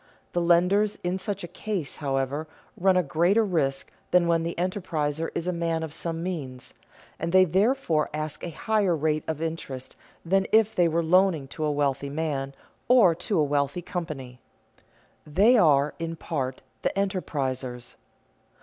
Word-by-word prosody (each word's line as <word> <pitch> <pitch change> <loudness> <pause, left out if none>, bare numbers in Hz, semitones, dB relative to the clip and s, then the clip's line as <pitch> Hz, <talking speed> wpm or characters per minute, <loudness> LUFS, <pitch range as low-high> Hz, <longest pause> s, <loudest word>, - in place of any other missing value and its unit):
The 175 - +1
lenders 180 +5 +3
in 180 +2 -1
such 200 -1 -4
a - - -4
case, 190 -6 -4
however, 140 +2 -2 0.3
run 185 0 +3
a 180 - +3
greater 175 +9 +2
risk 140 -8 -1 0.2
than 180 -1 +4
when 165 -1 +2
the 170 +1 -3
enterpriser 165 -4 -2
is 170 - -2
a 180 - 0
man 165 -1 -1
of 160 -2 -6
some 165 0 -4
means, 140 -9 -5 0.5
and 165 +1 -2
they 185 +1 +6
therefore 190 - +1
ask 155 0 -5
a - - -3
higher 200 +1 +1
rate 155 0 0
of 160 0 -3
interest 140 -5 -5 0.3
than 195 +3 +2
if 220 0 +4
they 175 -4 +3
were 165 +1 +1
loaning 175 -4 +3
to 155 - -5
a 150 - +1
wealthy 140 -1 0
man 140 -2 -3 0.3
or 235 -9 +6
to 185 +4 -2
a 155 - +4
wealthy 145 +3 0
company. 145 -9 -6 0.9
They 200 +11 +5
are 150 - +4
in 165 0 -3
part 135 -6 -4 0.2
the - - +1
enterprisers. 135 -10 -2
165 Hz, 160 wpm, -26 LUFS, 145-185 Hz, 0.9 s, they